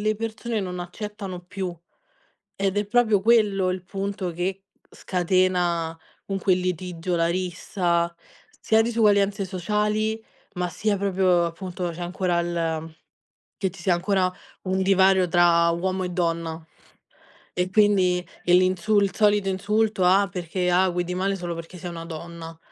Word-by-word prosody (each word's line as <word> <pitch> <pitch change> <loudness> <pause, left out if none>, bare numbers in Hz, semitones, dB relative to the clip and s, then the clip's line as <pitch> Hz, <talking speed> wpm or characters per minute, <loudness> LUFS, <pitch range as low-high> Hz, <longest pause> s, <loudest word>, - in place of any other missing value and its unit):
le 215 0 +1
persone 225 0 -3
non 180 -1 -4
accettano 195 +1 -6
più. 185 -2 -5 0.8
Ed 195 +1 0
è 205 - -1
proprio 220 -2 +3
quello, 205 -3 +3
il 185 0 -3
punto 195 -1 -3
che 185 +3 -3 0.3
scatena 180 -2 0 0.3
comunque 195 -1 +1
il 180 - -2
litigio, 180 -1 -2
la 165 0 +2
rissa, 170 -1 -1 0.5
sia 220 0 +3
disuguaglianze 205 -3 +2
sociali, 210 +4 -1 0.3
ma 180 -1 -2
sia 210 +4 0
proprio 190 -3 +2
appunto, 175 +1 -4
c'è 170 +1 -9
ancora 175 0 -1
il 165 -2 -3 0.6
che 190 -3 0
ci 175 0 -13
sia 185 - +2
ancora 185 +1 +1 0.3
un 190 0 0
divario 190 -1 +4
tra 170 -1 +4
uomo 185 +2 -1
e - - -2
donna. 165 -2 -2 0.9
E 180 +1 -1
quindi, 190 -3 +3 0.2
e 175 - +2
l'insuls 185 +3 +3
il 185 - -15
solito 205 -2 +3
insulto, 210 +1 +1
"Ah 195 +2 +4
perché 180 0 -2
ah 185 +2 +4
guidi 175 0 -2
male, 195 +2 0
solo 175 -2 -4
perché 165 +2 -9
sei 180 0 -6
una 165 -1 -7
donna." 165 0 -8
185 Hz, 145 wpm, -24 LUFS, 175-200 Hz, 0.9 s, divario